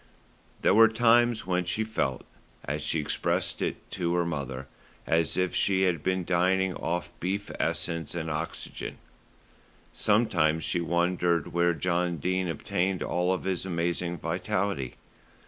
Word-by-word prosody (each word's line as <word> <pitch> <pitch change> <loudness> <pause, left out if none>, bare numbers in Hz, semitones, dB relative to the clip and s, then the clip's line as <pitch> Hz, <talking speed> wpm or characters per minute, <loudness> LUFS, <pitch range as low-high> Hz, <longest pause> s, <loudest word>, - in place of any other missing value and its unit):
There - - +5
were 115 +2 +8
times 120 0 +3
when 90 0 +1
she 90 +5 0
felt, 90 -12 -2 0.4
as 75 +2 -2
she 75 +2 0
expressed 75 - -1
it - - -3
to 85 -1 -1
her 85 -1 +2
mother, 70 -5 -4 0.4
as 80 -2 +1
if 90 -1 +1
she 95 -1 +2
had 90 -5 +1
been 95 +1 0
dining 95 +1 +2
off 85 -1 -3
beef 100 +3 -2
essence 85 -2 -1
and 80 -2 -3
oxygen. 80 +2 -5 1.0
Sometimes 85 -8 +2
she 90 - 0
wondered 85 -1 +1
where 85 0 +3
John 90 0 0
Dene 95 +4 0
obtained 90 +3 -1
all 90 +2 +1
his 95 -2 -2
amazing 85 -1 -1
vitality. 90 -4 -2
90 Hz, 135 wpm, -28 LUFS, 85-95 Hz, 1.0 s, were